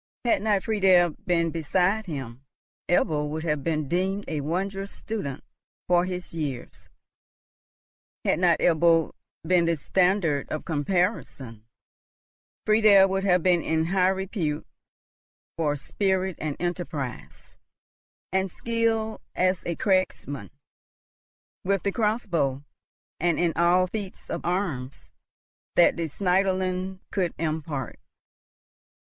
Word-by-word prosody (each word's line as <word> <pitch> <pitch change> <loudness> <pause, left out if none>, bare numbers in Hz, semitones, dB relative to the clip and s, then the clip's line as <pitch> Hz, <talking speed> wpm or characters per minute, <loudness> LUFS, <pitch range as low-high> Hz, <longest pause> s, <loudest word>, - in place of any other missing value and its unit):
Had 235 - +3
not 205 -2 +1
Friedel 190 -6 +4 0.2
been 170 -2 +2
beside 185 +6 0
him, 135 -5 -6 0.5
Ebbo 150 -4 +2
would 155 +1 -4
have 150 -4 -1
been 155 -3 -1
deemed 190 +5 -1
a 155 -2 -2
wondrous 195 +6 -3
student 200 -12 -5 0.4
for 175 0 +3
his 180 -2 -6
years; 145 -7 -5 1.4
had - - +2
not 175 -2 +4
Ebbo 165 -1 +3 0.3
been 175 0 +3
the 170 0 +2
standard 180 -2 +1
of 155 - -4
comparison, 145 - -2 1.0
Friedel 215 -3 +6
would 195 0 -1
have 180 -3 +3
been 180 -2 +4
in 160 0 0
high 185 +1 +2
repute 190 -5 -2 0.9
for 150 -3 0
spirit 190 +4 -1
and 155 -2 -3
enterprise 170 -7 -5 0.7
and 190 0 +1
skill 225 +1 -1
as 185 0 +1
a 170 - -1
cragsman, 185 -8 -1 1.1
with 195 0 0
the 200 - +1
crossbow, 170 - 0 0.6
and 170 0 +1
in 170 -2 +1
all 175 +2 +4
feats 195 0 -7
of - - -3
arms 165 -8 -3 0.6
that 175 - +5
the 170 -1 -2
Schneiderlein 185 +1 0
could 180 -4 -1
impart. 155 -3 -3
175 Hz, 115 wpm, -26 LUFS, 155-190 Hz, 1.4 s, Friedel